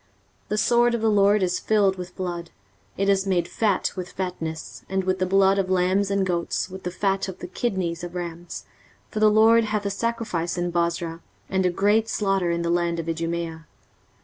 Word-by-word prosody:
23:034:006 - - -37
The 210 - 0
sword 240 +3 +3
of 235 - -3
the 225 -1 +3
LORD 205 0 +4
is 180 0 0
filled 205 -3 +2
with 180 -1 -8
blood, 175 -2 -4 0.5
it 195 - 0
is 195 0 +2
made 175 -3 +1
fat 205 -2 0
with 180 -1 -6
fatness, 165 -4 -5
and 190 0 0
with 185 0 0
the 185 - +1
blood 195 +1 +4
of 190 -1 -1
lambs 185 +2 +2
and 200 -1 +1
goats, 175 +1 -1
with 190 0 -8
the 180 - -3
fat 195 +1 0
of 190 -1 -7
the - - -7
kidneys 180 -3 -2
of 175 0 -7
rams: 175 -1 -6 0.4
for 215 - -4
the 215 0 +6
LORD 225 +2 +5
hath 210 -1 -2
a 200 - 0
sacrifice 200 -7 -2
in 175 0 -1
Bozrah, 170 -1 -1 0.3
and 190 -1 +2
a - - +3
great 205 +5 +2
slaughter 195 -5 +1
in 170 0 0
the 170 - 0
land 170 -1 0
of 165 - -4
Idumea. 165 -1 -3
185 Hz, 205 wpm, -24 LUFS, 175-200 Hz, 0.5 s, the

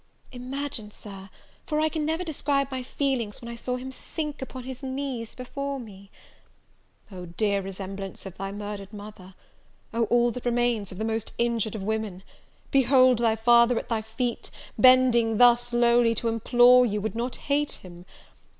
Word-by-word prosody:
Imagine, 255 -3 -5
Sir, 195 -2 -11 0.4
for 305 -1 0
I 310 - +3
can 310 -1 -2
never 320 +3 -1
describe 280 -4 -1
my 260 -1 -3
feelings, 250 -5 -2
when 235 - -10
I 235 - -6
saw 250 +2 -3
him 255 +1 -6
sink 300 +2 -6
upon 260 -1 -7
his 260 0 -8
knees 260 -4 -4
before 275 +2 -4
me! 200 -4 -12 1.0
"Oh, 180 -2 -8
dear 200 +3 0
resemblance 195 0 -7
of 190 -2 -8
thy 195 +1 -5
murdered 205 -1 -6
mother! 205 -3 -11 0.6
Oh, 230 0 +1
all 240 +2 +3
that 245 +2 -7
remains 240 -4 0
of 185 - -9
the 220 - -2
most 225 0 -3
injured 230 -2 0
of 205 - -5
women! 210 -3 -3 0.5
behold 255 -2 +5
thy 230 -2 +2
father 235 +1 +5
at - - -4
thy 225 -2 0
feet! 225 +2 -4 0.3
bending 250 -3 +5
thus 240 0 +5
lowly 240 -1 +4
to 230 +2 -1
implore 245 +2 +5
you 210 -3 0
would 220 +2 -3
not 240 +2 -3
hate 290 +1 -1
him. 175 -1 -12
235 Hz, 170 wpm, -26 LUFS, 210-255 Hz, 1.0 s, behold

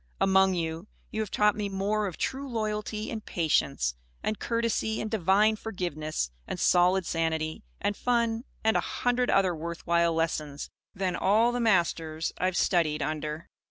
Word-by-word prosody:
Among 190 -1 +4
you, 165 +2 -3 0.2
you 220 - -2
have 215 - -3
taught 210 +1 +3
me 210 -1 -2
more 205 +2 0
of 180 - -6
true 275 +1 -3
loyalty 215 -1 -3
and 220 -2 -5
patience 140 - +1 0.3
and 215 - -1
courtesy 230 -1 0
and 215 - -3
divine 210 +2 +3
forgiveness 155 - -3 0.2
and - - -4
solid 180 +1 +4
sanity 160 -1 -1 0.2
and 205 - 0
fun 235 0 0 0.2
and 220 0 +3
a - - +4
hundred 245 0 0
other 190 -2 +3
worth 170 +2 -6
while 170 -1 +3
lessons, 155 -3 -2 0.2
than 185 -2 -1
all 220 +5 +3
the 245 - -2
masters 170 -7 +1
I - - +1
have 185 -1 0
studied 155 -4 +2
under. 155 +1 -4
190 Hz, 160 wpm, -28 LUFS, 165-215 Hz, 0.3 s, Among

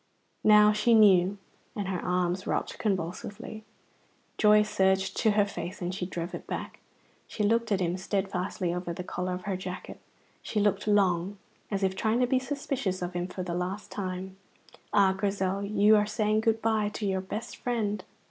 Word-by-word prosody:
Now 210 0 +7
she 220 +2 +3
knew, 195 -2 +5 0.4
and 205 -3 -3
her 185 -2 -3
arms 180 +1 0
rocked - - -2
convulsively. 205 +3 -3 0.8
Joy 210 0 +6
surged 190 -2 +1
to 220 - +3
her 205 - +5
face, 200 -1 -6
and 180 -1 -3
she 180 -1 -3
drove 175 -1 -5
it - - -7
back. - - -5 0.5
She 215 - -3
looked 230 +2 +2
at 195 -2 +2
him 175 0 0
steadfastly 190 -2 -2
over 180 -1 -3
the 180 - -6
collar 180 0 -3
of 180 - -8
her 195 0 -2
jacket; 185 0 -7 0.4
she 215 - -2
looked 205 0 +1
long, 195 -2 +2 0.3
as 200 -1 -2
if 190 0 +1
trying 220 +4 +1
to 250 - +4
be 255 +1 +2
suspicious 260 -8 -3
of 175 0 -4
him 175 0 -2
for 185 0 -5
the 175 -1 -4
last 180 +4 -4
time. 190 -1 -5 0.5
Ah, 200 -2 +4
Grizel, 195 0 -1
you 205 +1 +4
are 210 0 +3
saying 215 0 +1
good 225 0 +1
bye 220 -2 +2
to 215 - -4
your 190 -1 0
best 205 +4 -6
friend! 210 -5 -2
195 Hz, 180 wpm, -28 LUFS, 185-210 Hz, 0.8 s, Now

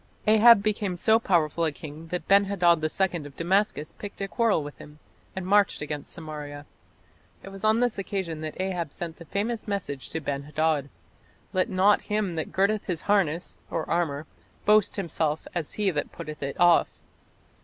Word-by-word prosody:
Ahab 220 0 +7
became 205 -4 -1
so 220 +5 +4
powerful 170 -6 +1
a 160 - +2
king 155 +2 -10
that 180 +2 -4
Ben 200 +1 +6
hadad 175 -5 +3
II 170 0 0
of 140 - -16
Damascus 180 -3 0
picked 205 - -8
a 195 - -2
quarrel 220 -6 +1
with 145 0 -8
him, 150 0 -12 0.4
and 190 -1 -4
marched 200 +1 +3
against 150 -1 -5
Samaria. 150 -3 -7 0.8
It - - -8
was 195 +1 -10
on 220 +2 +3
this 245 -4 0
occasion 185 -5 -3
that 155 +2 -6
Ahab 180 -5 -2
sent 165 -2 -6
the 170 - -11
famous 215 +7 -2
message 180 -10 -3
to 160 - -3
Ben 140 -2 -3
hadad: 150 -1 0 0.6
"Let 185 -1 +1
not 195 +2 +4
him 210 -4 -1
that 160 -1 -4
girdeth 200 +2 +1
on - - -23
his 170 -2 -1
harness 180 -5 0
(armour) 160 -2 -1 0.4
boast 210 0 +4
himself 160 -5 -1
as 170 -4 -3
he 205 -2 +1
that 150 -3 -3
putteth 150 0 -8
it 140 0 -4
off". 175 -1 +4
175 Hz, 175 wpm, -26 LUFS, 155-200 Hz, 0.8 s, Ahab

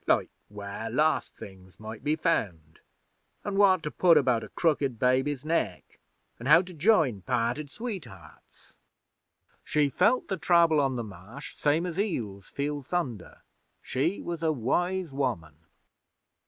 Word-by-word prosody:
'Like - - +2 0.2
where 105 +2 -6
lost 155 +7 +1
things 95 -2 -13
might 110 0 -8
be 150 +1 +1
found, 85 - -2 0.7
an' 205 - -2
what 190 -4 +4
to 150 - -3
put 170 -3 +5
about 125 -5 +2
a - - -9
crooked 145 -7 0
baby's 130 +3 +1
neck, 125 - -2 0.4
an' 120 - -6
how 165 +5 +7
to 180 0 -11
join 155 - +3
parted 125 +6 -1
sweethearts. 165 - -9 0.9
She 150 -2 +1
felt 250 - +2
the 190 - -2
Trouble 170 -2 +4
on 135 -2 +1
the 120 - -3
Marsh 105 +7 -10
same 150 +4 +1
as 175 0 -4
eels 110 - -3
feel 145 +1 -3
thunder. 130 - -4 0.4
She 160 +9 -1
was 170 -1 -4
a 160 -1 +2
wise 175 +7 -1
woman.' 115 - -3
145 Hz, 140 wpm, -28 LUFS, 115-170 Hz, 0.9 s, how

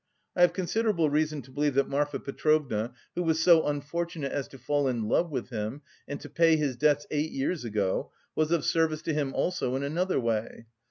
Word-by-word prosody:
I 175 - +1
have 175 - +7
considerable 185 -4 +1
reason 150 -1 0
to 130 - -16
believe 145 0 0
that 140 0 +3
Marfa 145 +1 -1
Petrovna, 140 -6 0 0.2
who 180 - -2
was 160 -2 +1
so 165 -1 +5
unfortunate 150 +1 -3
as 140 -2 -2
to 135 - -13
fall 145 +3 0
in 120 -4 -1
love 170 +9 +2
with 130 -5 -4
him 110 +6 -4 0.2
and 145 - -5
to - - -8
pay 165 -1 +4
his 145 -4 0
debts 145 +2 +2
eight 150 +1 0
years 140 +3 -2
ago, 105 -5 -1 0.2
was 155 0 +1
of 170 -3 +1
service 160 -2 +1
to 160 - -1
him 145 -3 0
also 150 -8 0
in 135 - -2
another 170 +6 0
way. 115 -1 -2
145 Hz, 205 wpm, -28 LUFS, 135-160 Hz, 0.2 s, have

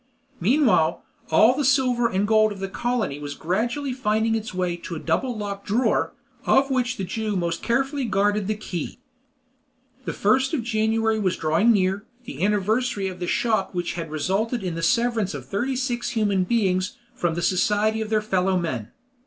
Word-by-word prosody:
Meanwhile, 210 - +3 0.3
all 215 +10 +6
the 295 - 0
silver 250 -3 +3
and 200 -1 0
gold 215 0 +4
of 205 - -6
the 195 - -3
colony 225 - -2
was 145 -1 -6
gradually 240 - -1
finding 220 -2 +1
its 225 -1 -2
way 180 -1 -1
to 170 0 -7
a - - -4
double 250 +5 -1
locked 200 -1 -5
drawer, 225 +3 +1 0.4
of 275 0 +4
which 255 -1 0
the 195 - -3
Jew 215 +2 -2
most 170 -2 -1
carefully 270 +3 0
guarded 205 -1 +1
the 215 - 0
key. 195 -5 -5 1.1
The - - -2
1st 265 +2 +2
of 250 - -2
January 220 -1 +1
was 185 -3 0
drawing 165 +9 +3
near, 195 -1 +1 0.2
the 150 - -5
anniversary 210 0 +1
of 180 -1 -9
the 175 - -3
shock 215 -4 0
which 175 -1 -2
had 165 -2 -5
resulted 195 - -1
in 180 -2 -2
the 165 - -4
severance 230 -1 +1
of - - -7
thirty 245 +7 -2
six 245 -2 -2
human 205 -5 +1
beings 185 -4 0 0.2
from 170 -2 -1
the 170 - -2
society 210 +4 +2
of 220 - -4
their 215 -1 +1
fellow 190 -2 +1
men. 130 -11 -3
210 Hz, 180 wpm, -24 LUFS, 185-235 Hz, 1.1 s, all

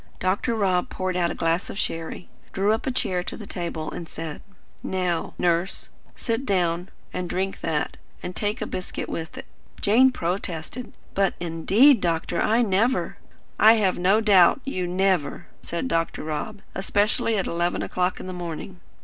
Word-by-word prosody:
Dr. 195 +6 0
Rob 185 -4 +1
poured 185 -1 -2
out 175 -1 +2
a - - -4
glass 165 +2 0
of - - -6
sherry, 165 -2 -3 0.3
drew 200 +2 +2
up 225 - -2
a - - +2
chair 185 -7 0
to - - -6
the 215 - -8
table, 170 -4 -4
and 165 -2 -7
said: 160 -2 -6 0.4
"Now, 180 -3 -1
Nurse, 175 +2 0 0.3
sit 230 +2 -2
down 180 -5 0 0.2
and 180 -1 -3
drink 190 +1 -2
that, 160 -2 -1 0.3
and 180 - -5
take 210 +2 -1
a - - -2
biscuit 185 - -4
with 165 0 -5
it." - - -7 0.3
Jane 250 +6 +5
protested. 180 +3 -4 0.2
"But, 195 -1 +2
indeed, 195 - +4
doctor, 170 0 0
I 230 +3 +3
never 225 +5 +1 0.2
" - - -33 0.2
"I 220 +1 +9
have 200 -6 +1
no 195 +5 +4
doubt 200 +2 +6
you 185 -10 -2
'never,'" 180 -5 +1 0.2
said 170 +10 -3
Dr. 165 -8 -1
Rob, 155 +7 -4
"especially 205 +3 +1
at 195 - 0
eleven 170 +1 0
o'clock 180 0 -1
in - - -7
the 185 - -5
morning. 175 +1 -6
185 Hz, 170 wpm, -25 LUFS, 170-205 Hz, 0.4 s, I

